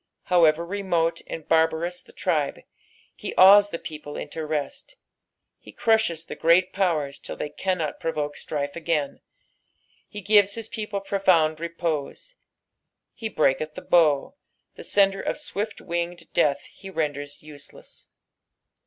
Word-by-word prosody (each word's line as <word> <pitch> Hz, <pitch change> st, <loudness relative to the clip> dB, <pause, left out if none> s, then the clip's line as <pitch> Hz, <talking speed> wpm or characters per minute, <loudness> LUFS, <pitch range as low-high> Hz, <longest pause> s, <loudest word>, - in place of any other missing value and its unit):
However 170 Hz, -2 st, +3 dB
remote 175 Hz, -3 st, -1 dB
and 160 Hz, -, -7 dB
barbarous 165 Hz, +2 st, +1 dB
the -, -, -18 dB
tribe, -, -, -1 dB, 0.5 s
he -, -, -6 dB
awes 200 Hz, +2 st, +8 dB
the 170 Hz, -, -4 dB
people 150 Hz, -2 st, -8 dB
into 155 Hz, +2 st, -5 dB
rest. 150 Hz, -, -4 dB, 0.6 s
He -, -, -14 dB
crushes 220 Hz, -8 st, +1 dB
the -, -, -7 dB
great 175 Hz, +3 st, +3 dB
powers 160 Hz, -8 st, 0 dB
till -, -, -7 dB
they 150 Hz, -, -4 dB
cannot 165 Hz, 0 st, -2 dB
provoke 150 Hz, -2 st, -2 dB
stnfe 145 Hz, -1 st, -4 dB
again 160 Hz, -4 st, -1 dB
j -, -, -39 dB, 0.9 s
he 210 Hz, -, -7 dB
gives 200 Hz, 0 st, +4 dB
his 225 Hz, -1 st, -5 dB
people 210 Hz, -3 st, -4 dB
profound 180 Hz, -6 st, +2 dB
repose. 170 Hz, -, -4 dB, 0.4 s
" -, -, -36 dB
Ht 220 Hz, -2 st, -4 dB
breaheth 150 Hz, +2 st, +1 dB
the -, -, -8 dB
boa," 155 Hz, -, +3 dB, 0.4 s
the -, -, -11 dB
senderof 195 Hz, -1 st, +1 dB
swift 220 Hz, -8 st, -4 dB
winged 170 Hz, 0 st, -4 dB
death 140 Hz, -1 st, +2 dB
he 195 Hz, -, -13 dB
renders 145 Hz, -5 st, -3 dB
useless. 150 Hz, -2 st, -12 dB
170 Hz, 135 wpm, -25 LUFS, 155-195 Hz, 0.9 s, awes